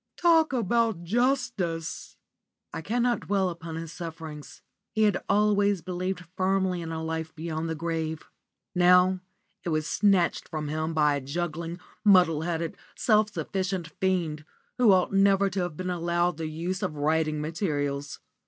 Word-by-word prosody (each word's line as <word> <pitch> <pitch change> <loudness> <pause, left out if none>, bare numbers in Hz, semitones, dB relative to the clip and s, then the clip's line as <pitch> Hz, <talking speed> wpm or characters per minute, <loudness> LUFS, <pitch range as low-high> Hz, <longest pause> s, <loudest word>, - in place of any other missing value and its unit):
Talk 325 -3 +4
about 230 -5 +1
justice!" 195 -6 -1 0.6
I - - -4
cannot 240 +5 +1
dwell 195 -2 +2
upon 165 -1 -7
his 165 -1 -6
sufferings. 160 -3 -8 0.3
He 220 +1 +1
had 210 -1 +2
always 205 -3 +3
believed 180 0 -3
firmly 190 -1 +1
in 165 -1 -5
a 160 0 -4
life 160 0 -4
beyond 160 0 -3
the 160 - -2
grave. 160 -1 -3 0.5
Now 180 +1 +5 0.4
it 175 - -3
was 155 -1 0
snatched 195 -1 +2
from 155 -2 -4
him 155 +1 -2
by 150 -2 +3
a - - -5
juggling, 170 +4 -4 0.2
muddle 180 -7 +5
headed, 165 -1 -3 0.2
self 215 -2 +3
sufficient 190 -4 -3
fiend, 170 -5 0 0.4
who 240 -4 +6
ought 185 0 +3
never 195 0 +4
to 190 - -2
have 175 -4 -4
been 185 0 -3
allowed 175 -1 0
the 160 -1 -3
use 170 +5 -3
of 185 -6 -2
writing 155 +1 +1
materials. 145 -3 -2
175 Hz, 150 wpm, -27 LUFS, 160-195 Hz, 0.6 s, who